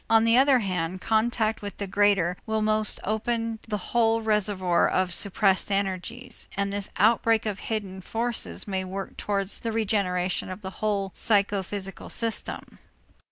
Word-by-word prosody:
On 225 0 +5
the 230 0 +4
other 270 +1 +6
hand, 185 -4 -2
contact 220 +1 0
with 205 -1 -7
the 200 - -3
greater 195 -3 +2
will 220 0 0
must 215 0 0
open 225 +1 -2
the 210 -2 -1
whole 225 +2 +1
reservoir 205 -5 +2
of 185 -1 0
suppressed 195 0 +2
energies, 195 -2 -3
and 200 0 -1
this 205 -1 -3
outbreak 225 +2 +3
of 205 -3 -3
hidden 200 -4 -4
forces 230 +4 -1
may 190 -2 -2
work 190 +1 -6
towards 200 -1 +1
the 230 - -3
regeneration 190 -5 0
of 185 +2 -7
the 190 -1 -6
whole 200 -3 0
psychophysical 200 -2 0
system. 230 -2 -1
205 Hz, 150 wpm, -26 LUFS, 190-220 Hz, -, other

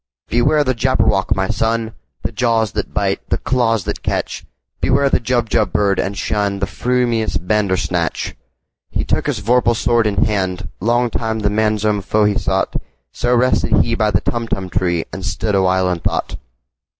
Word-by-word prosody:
"Beware 145 +6 +3
the 130 -2 +1
Jabberwock, 120 -5 +1
my 95 0 0
son! 115 0 0 0.3
The - - -2
jaws 115 -4 +1
that - - -3
bite, - - -1
the - - +1
claws 115 -5 +1
that - - -4
catch! - - -2 0.4
Beware 140 +1 +2
the - - +3
Jubjub 120 -2 0
bird, 100 -2 +1
and 100 - -1
shunThe 100 -1 -1
frumious 120 -3 0
Bandersnatch!"He 90 - -3
took - - 0
his 125 -8 -1
vorpal 120 +2 +3
sword 115 -1 +2
in 100 -2 +1
hand:Long 105 +4 -1
time 110 -1 -1
the 105 - +2
manxome 105 -1 +1
foe 105 +3 +1
he 105 - +3
sought—So 95 - -2
rested 125 +1 +2
he 115 - -2
by 110 -2 +2
the 95 -3 +1
Tumtum 115 -6 -3
tree, 85 -2 0
And 95 - -6
stood 100 +2 -2
awhile 95 -1 +2
in 90 - -2
thought. - - -2
110 Hz, 155 wpm, -18 LUFS, 95-120 Hz, 0.4 s, Beware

